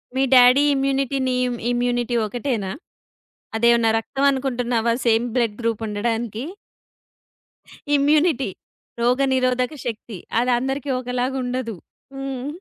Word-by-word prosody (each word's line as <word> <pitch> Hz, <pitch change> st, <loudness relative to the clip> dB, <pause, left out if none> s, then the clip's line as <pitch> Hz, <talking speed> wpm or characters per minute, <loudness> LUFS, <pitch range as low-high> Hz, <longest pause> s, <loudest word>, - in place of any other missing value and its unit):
మీ 265 Hz, -, +2 dB
daddy 250 Hz, +3 st, +7 dB
immunity 275 Hz, 0 st, 0 dB
నీ 255 Hz, -, +1 dB
ఇమ్ 240 Hz, -1 st, -3 dB
immunity 245 Hz, 0 st, 0 dB
ఒకటేనా? 225 Hz, -4 st, -3 dB, 0.9 s
అదేమన్నా 235 Hz, -1 st, +4 dB
రక్తం 275 Hz, +4 st, -2 dB
అనుకుంటున్నావా 245 Hz, -3 st, 0 dB
సేమ్ 230 Hz, +1 st, +3 dB
బ్లడ్ 230 Hz, -4 st, +1 dB
గ్రూప్ 230 Hz, -1 st, -1 dB
ఉండడానికి? 225 Hz, +2 st, -2 dB, 1.5 s
ఇమ్యూనిటీ. 290 Hz, -, +3 dB, 0.5 s
రోగనిరోధక 255 Hz, +1 st, +1 dB
శక్తి. 220 Hz, -3 st, -5 dB, 0.2 s
అది 250 Hz, +1 st, +1 dB
అందరికీ 270 Hz, +2 st, -3 dB
ఒకలాగా 250 Hz, +1 st, -2 dB
ఉండదు. 245 Hz, -3 st, -3 dB, 0.4 s
హ్మ్. 270 Hz, -1 st, -5 dB
245 Hz, 105 wpm, -22 LUFS, 235-270 Hz, 1.5 s, daddy